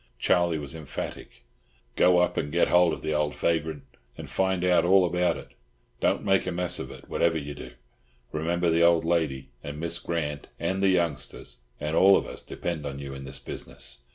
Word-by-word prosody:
Charlie 85 -2 +2
was 70 -1 -5
emphatic. 75 -5 -7 0.5
"Go 90 0 +5
up 90 0 +2
and 75 - -2
get 85 +2 +3
hold 90 -1 +5
of - - -5
the 80 0 -1
old 75 -1 0
vagrant, 80 -3 -1 0.3
and - - -7
find 95 -1 0
out 90 -1 +4
all 95 +1 +5
about 90 +1 +1
it. - - -11 0.5
Don't - - +1
make 95 -1 +2
a - - 0
mess 90 0 -1
of - - -5
it, - - -12
whatever 80 -1 +1
you 75 -1 -5
do. - - -10 0.6
Remember 85 +2 0
the 85 +1 +3
old 85 -1 +5
lady, 75 -6 0
and 75 +1 -6
Miss 85 +1 -3
Grant, 75 -4 -3
and 95 +1 -1
the 100 - +4
youngsters, 85 -11 -1 0.2
and 75 +1 -2
all 95 +1 +7
of - - -2
us - - -7
depend 85 -3 -4
on 70 -2 -5
you 70 -1 -6
in 70 0 -8
this 65 0 -7
business. 65 - -6
85 Hz, 200 wpm, -27 LUFS, 75-90 Hz, 0.6 s, all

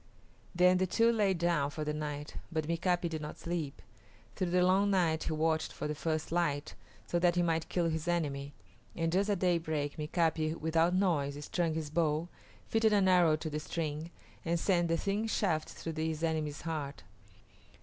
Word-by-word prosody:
Then 180 +1 +5
the 185 - +2
two 230 +5 +3
lay 205 -4 +2
down 170 -4 +1
for 155 +1 -4
the 150 0 -2
night, 150 -1 -5
but 155 -2 -1
Mika´pi 175 +1 +1
did 160 -2 -4
not 150 - -6
sleep. 155 - -4 0.5
Through 185 - -1
the 180 +1 +3
long 195 +2 +4
night 170 -5 +2
he - - -1
watched 160 0 0
for - - -4
the 150 - -2
first 155 +1 -2
light, 155 -4 0 0.3
so 175 - 0
that 175 0 +3
he 175 - +3
might 165 -1 0
kill 175 -2 +1
his 160 0 -2
enemy; 145 -5 -1 0.4
and 165 -1 0
just 195 +4 +1
at 205 - +2
daybreak 160 -5 0
Mika´pi, 160 0 0
without 165 +2 +2
noise, 150 -7 +1
strung 170 -3 0
his 155 -2 -4
bow, 160 0 +1 0.4
fitted 225 -1 +3
an 200 -2 +4
arrow 175 -4 +5
to 155 +1 -4
the 150 - -2
string, 155 0 -4 0.3
and 170 0 0
sent 175 -1 +2
the 165 0 +1
thin 205 +5 -1
shaft 175 -8 0
through 165 - -6
his 160 0 -2
enemy's 155 -2 -1
heart. 150 - -4
165 Hz, 185 wpm, -32 LUFS, 155-175 Hz, 0.5 s, Then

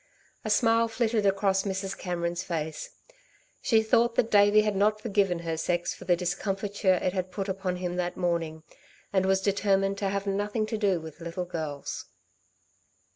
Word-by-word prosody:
A 215 - -3
smile 230 +1 +4
flitted 225 -2 +1
across 195 0 +2
Mrs. 195 0 -3
Cameron's 175 -1 -2
face. 160 -4 -4 0.7
She 220 -2 +3
thought 230 +2 +3
that 230 - +1
Davey 205 +1 +6
had 210 -1 0
not 210 +2 +2
forgiven 200 -5 +1
her 165 -1 -1
sex 175 +2 -1
for - - -12
the 175 - +4
discomfiture 195 +2 0
it 180 0 -1
had 185 -1 -2
put 190 +2 -4
upon 190 -1 -2
him 180 0 -3
that 180 0 -2
morning, 165 -3 -1 0.5
and 190 -1 +2
was 190 0 +3
determined 195 0 +1
to 195 - 0
have 200 0 -2
nothing 205 +2 -1
to 220 0 -3
do 195 -4 +2
with 160 +1 -10
little 170 +2 -4
girls. 155 -5 -5
195 Hz, 170 wpm, -28 LUFS, 175-205 Hz, 0.7 s, Davey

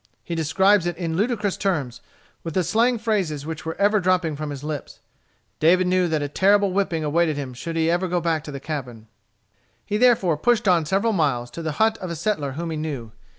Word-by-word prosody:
He 170 - -5
describes 175 +4 +3
it 175 -1 -3
in 165 -2 -3
ludicrous 205 0 0
terms, 155 - -2 0.4
with 165 - -6
the 185 - +2
slang 235 +6 +2
phrases 195 -10 -1
which 160 0 -6
were 160 - -3
ever 205 +1 +3
dropping 180 -4 +1
from 150 +1 -5
his 145 -1 -7
lips. 150 -2 -6 0.6
David 180 +4 +4
knew 180 0 +2
that 155 -3 -1
a - - -1
terrible 200 +5 +3
whipping 180 -5 0
awaited 155 0 +1
him 135 -3 -5
should 165 +7 -6
he 165 +1 +2
go 180 0 -1
back 165 -2 -1
to 150 - -6
the 140 - -6
cabin. 130 -7 -6 0.8
He 210 - -1
therefore 215 -9 +3
pushed 235 +5 +1
on 170 -4 +3
several 200 +6 +1
miles, 130 -9 0
to 170 - -7
the 160 -2 -3
hut 220 +7 +2
of 185 - -5
a 170 - -4
settler 155 -5 -2
whom 165 +3 -4
he 160 - -3
knew. 140 -8 -5
170 Hz, 210 wpm, -23 LUFS, 150-195 Hz, 0.8 s, David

